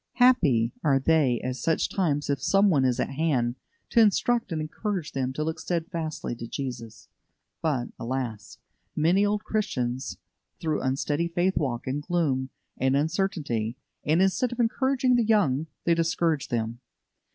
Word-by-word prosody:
Happy 150 - +4
are 140 -4 +4
they 135 -4 +3
at 130 0 -3
such 160 +6 +1
times 150 -7 0
if 140 -2 -1
some 195 0 +4
one 140 -5 +3
is 125 -2 +1
at - - -1
hand 135 -5 0 0.3
to 235 - +2
instruct 225 +1 +2
and 160 - -1
encourage 165 +1 -3
them 130 -1 -1
to 150 +3 -3
look 160 +1 -3
steadfastly 165 -4 -3
to 115 0 -7
Jesus. 115 -6 -6 0.5
But, 135 -7 0
alas! 120 -3 -4 0.4
many 175 +6 +3
old 205 +1 0
Christians 130 - -2 0.4
through 155 -2 -1
unsteady 145 +5 0
faith 175 +3 0
walk 130 -5 -1
in 130 +2 -1
gloom 145 -5 0 0.3
and 130 +1 +2
uncertainty, 145 - -1 0.3
and, 160 +5 +3
instead 210 +6 +1
of 240 - -6
encouraging 255 +2 +2
the 240 - +3
young, 165 -10 +2 0.2
they 170 - +3
discourage 165 -2 +1
them. 115 0 -2
155 Hz, 150 wpm, -26 LUFS, 130-185 Hz, 0.5 s, Happy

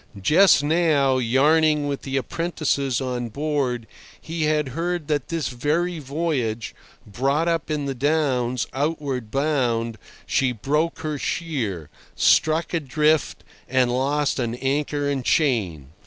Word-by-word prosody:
Just 155 - +5
now, 145 -4 +2
yarning 150 +5 +3
with 140 -1 -3
the 135 0 -3
apprentices 140 -4 -1
on 125 -2 -3
board, 135 -3 -2 0.3
he 165 -1 -3
had 150 -2 +1
heard 170 +3 -3
that 145 -3 0
this 165 -5 -2
very 155 +7 -1
voyage, 135 -7 -2 0.3
brought 135 +9 0
up 165 -2 -1
in 150 -2 -1
the 135 - -2
Downs, 130 -3 0
outward 140 -4 -2
bound, 120 -5 0 0.3
she 130 -2 +1
broke 150 +8 -1
her 155 -2 -3
sheer, 110 - -3 0.2
struck 160 +2 +3
adrift, 155 0 +1 0.3
and 130 -1 +2
lost 140 +3 0
an 120 -1 -1
anchor 145 +2 -1
and 140 -2 -1
chain. 100 - 0
140 Hz, 125 wpm, -23 LUFS, 125-155 Hz, 0.3 s, Just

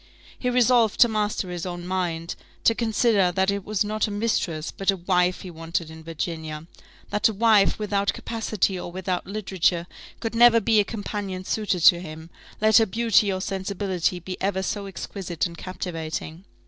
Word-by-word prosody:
He 250 - 0
resolved 245 -3 +3
to 240 - +9
master 210 -4 -1
his 175 -2 -5
own 175 -1 -5
mind: 175 -3 -2 0.3
to 230 - +5
consider 220 -4 +2
that 190 +2 +2
it 200 -1 -3
was 210 0 0
not 215 +1 0
a - - -5
mistress, 205 -7 -1
but 195 - -3
a 195 - +3
wife 180 0 +1
he 185 - -8
wanted 165 0 -4
in 160 0 -11
Virginia; 160 -1 -5 0.5
that 210 +2 +3
a - - -3
wife 215 -2 +4
without 200 -1 0
capacity 215 -4 -2
or 175 - -6
without 180 0 -3
literature 190 -4 0 0.3
could 225 -1 -3
never 230 0 +7
be 220 0 +3
a - - +5
companion 200 -3 -5
suited 200 -2 -1
to 170 +2 +7
him, 160 0 -9 0.3
let 215 0 +5
her 225 - +5
beauty 220 0 +3
or 185 0 -2
sensibility 190 -2 -2
be 185 +1 -6
ever 190 -1 0
so 200 +1 -3
exquisite 185 -3 -4
and 170 -2 -7
captivating. 165 -1 -5
190 Hz, 175 wpm, -24 LUFS, 175-215 Hz, 0.5 s, to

